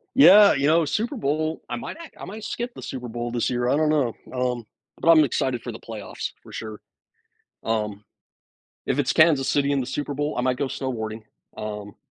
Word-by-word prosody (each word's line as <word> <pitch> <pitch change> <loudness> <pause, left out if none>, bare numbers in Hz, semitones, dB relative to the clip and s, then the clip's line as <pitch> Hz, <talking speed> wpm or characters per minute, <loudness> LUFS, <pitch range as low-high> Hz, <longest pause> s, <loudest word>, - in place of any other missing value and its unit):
Yeah. 210 -6 +9
You 140 0 +1
know, 165 +2 +4
Super 225 - -1
Bowl, 155 - -1
I - - -3
might 240 - -6
act 335 -2 -12
I - - -6
might 210 +4 -8
skip 240 +3 -4
the - - -10
Super 125 -2 -6
Bowl 120 +1 -4
this 120 -1 0
year. 120 0 0
I 135 - +3
don't 155 0 +2
know. 145 -7 +1 0.2
Um, 125 -2 -1 0.3
but 165 - +4
I'm 155 -2 +7
excited 125 -2 -1
for 120 - -5
the 110 - -9
playoffs 110 -3 -6
for - - -14
sure. 110 -1 -7 0.8
Um, 105 -2 -2 0.8
if - - 0
it's - - +1
Kansas 155 -5 +5
City 140 0 +2
in 140 - +2
the 125 - -2
Super 145 +2 -3
Bowl, 145 +2 -2
I - - +1
might 125 0 +1
go 140 - -1
snowboarding. 110 -5 -4 0.3
Um, 105 -1 -6
130 Hz, 210 wpm, -24 LUFS, 115-155 Hz, 0.8 s, Yeah